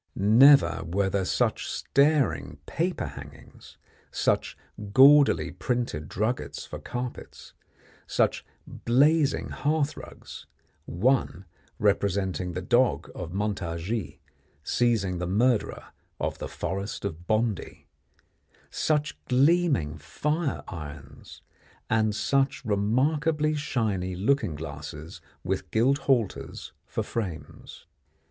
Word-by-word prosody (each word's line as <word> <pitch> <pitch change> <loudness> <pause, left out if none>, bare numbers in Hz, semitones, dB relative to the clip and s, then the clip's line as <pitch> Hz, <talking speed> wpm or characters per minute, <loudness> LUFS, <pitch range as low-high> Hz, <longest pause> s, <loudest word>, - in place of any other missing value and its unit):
Never 110 - +6
were 95 +3 -1
there 95 -1 0
such - - 0
staring 140 - +1
paper 175 +3 -2
hangings, - - -12 0.3
such - - 0 0.3
gaudily 140 +4 +6
printed 120 - -3
druggets 105 - -2
for - - -8
carpets, 125 0 -7 0.5
such - - +1 0.2
blazing 145 +5 +2
hearthrugs 150 0 -3 0.4
one 100 -1 0 0.3
representing 100 -3 0
the 90 +2 -4
dog 120 +6 +2
of 85 -2 -6
Montargis 95 0 -3 0.5
seizing 105 -6 +1
the 90 - -2
murderer 115 +4 0 0.3
of - - -3
the - - -5
Forest 100 +2 -4
of 85 -2 -6
Bondy 110 -2 -1 0.9
such 150 -1 -1
gleaming 135 - +2
fire 150 - -2
irons, 75 -3 -10 0.5
and 110 -1 +2
such 135 +2 0
remarkably 150 +9 +1
shiny 110 -11 -2
looking 105 - +1
glasses 75 +1 -8 0.2
with - - -3
gilt 130 +6 +2
halters 125 -7 -1
for - - -3
frames. 95 -9 -6
110 Hz, 95 wpm, -27 LUFS, 90-140 Hz, 0.9 s, Never